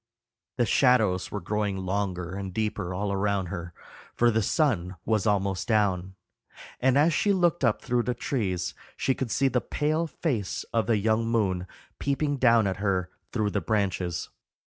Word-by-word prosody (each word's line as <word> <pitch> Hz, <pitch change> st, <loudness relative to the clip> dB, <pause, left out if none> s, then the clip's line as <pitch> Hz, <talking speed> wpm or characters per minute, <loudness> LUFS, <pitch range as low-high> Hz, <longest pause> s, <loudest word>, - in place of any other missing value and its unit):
The 120 Hz, -, +3 dB
shadows 110 Hz, -8 st, +3 dB
were 105 Hz, -, -4 dB
growing 105 Hz, +1 st, -1 dB
longer 95 Hz, -2 st, -2 dB
and 95 Hz, -1 st, -5 dB
deeper 105 Hz, -2 st, -2 dB
all 100 Hz, +2 st, -2 dB
around 100 Hz, -2 st, 0 dB
her, 85 Hz, -2 st, -5 dB, 0.4 s
for 120 Hz, 0 st, +4 dB
the 110 Hz, 0 st, +2 dB
sun 100 Hz, -, +1 dB
was 110 Hz, -3 st, +1 dB
almost 100 Hz, -2 st, 0 dB
down, 95 Hz, -4 st, +1 dB, 0.6 s
and 130 Hz, +1 st, +3 dB
as 155 Hz, +3 st, +4 dB
she 205 Hz, -, +2 dB
looked 175 Hz, -4 st, +2 dB
up 115 Hz, -4 st, +2 dB
through 120 Hz, 0 st, +1 dB
the 125 Hz, +1 st, -2 dB
trees 95 Hz, -8 st, -2 dB, 0.2 s
she 135 Hz, -, +1 dB
could 130 Hz, -2 st, -3 dB
see 135 Hz, +5 st, +2 dB
the 125 Hz, -1 st, +1 dB
pale 155 Hz, +3 st, 0 dB
face 125 Hz, -, -2 dB
of 115 Hz, -3 st, +1 dB
the 115 Hz, -, +3 dB
young 110 Hz, +2 st, +1 dB
moon 95 Hz, -6 st, 0 dB, 0.3 s
peeping 145 Hz, +1 st, 0 dB
down 115 Hz, -4 st, +4 dB
at 95 Hz, -1 st, -1 dB
her 95 Hz, -2 st, -1 dB, 0.2 s
through 105 Hz, -3 st, 0 dB
the 100 Hz, -, -1 dB
branches. 95 Hz, -3 st, -1 dB
105 Hz, 170 wpm, -27 LUFS, 95-125 Hz, 0.6 s, for